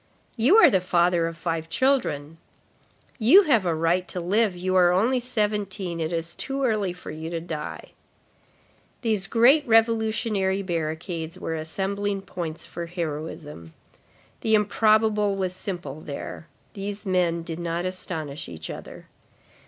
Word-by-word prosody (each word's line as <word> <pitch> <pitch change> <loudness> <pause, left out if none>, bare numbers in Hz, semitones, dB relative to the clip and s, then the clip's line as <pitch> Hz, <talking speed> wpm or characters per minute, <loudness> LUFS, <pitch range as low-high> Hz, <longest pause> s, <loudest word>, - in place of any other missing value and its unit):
—"You 260 - +5
are 340 -10 +8
the 190 - +3
father 175 -1 +2
of 165 0 -6
five 165 -2 -3 1.5
children."—"You 310 - +7
have 235 - +3
a 165 - +1
right 170 +3 +1
to 180 - -5
live, 195 +2 +1
you 185 +1 -1
are 180 -1 +6
only 230 +8 +2
seventeen, 210 -7 -2
it 160 0 -2
is 165 0 -3
too 275 0 -3
early 215 -6 +1
for 180 -2 -9
you 160 +1 -6
to 170 -1 -3
die." 160 -2 -6 1.1
These 215 -5 +1
great 245 +8 +5
revolutionary 220 -3 +2
barricades 165 0 -3
were 165 - -4
assembling 195 +5 -2
points 170 -4 -6
for 170 0 -6
heroism. 150 - -6 0.6
The 220 -1 +2
improbable 210 -1 +3
was 185 -2 -2
simple 175 -6 -6
there. 150 +3 -7 0.3
These 205 0 -6
men 175 -3 +1
did 165 0 -6
not 170 +1 -2
astonish 160 -5 -5
each 80 -2 -7
other. - - -10
185 Hz, 135 wpm, -25 LUFS, 165-210 Hz, 1.5 s, are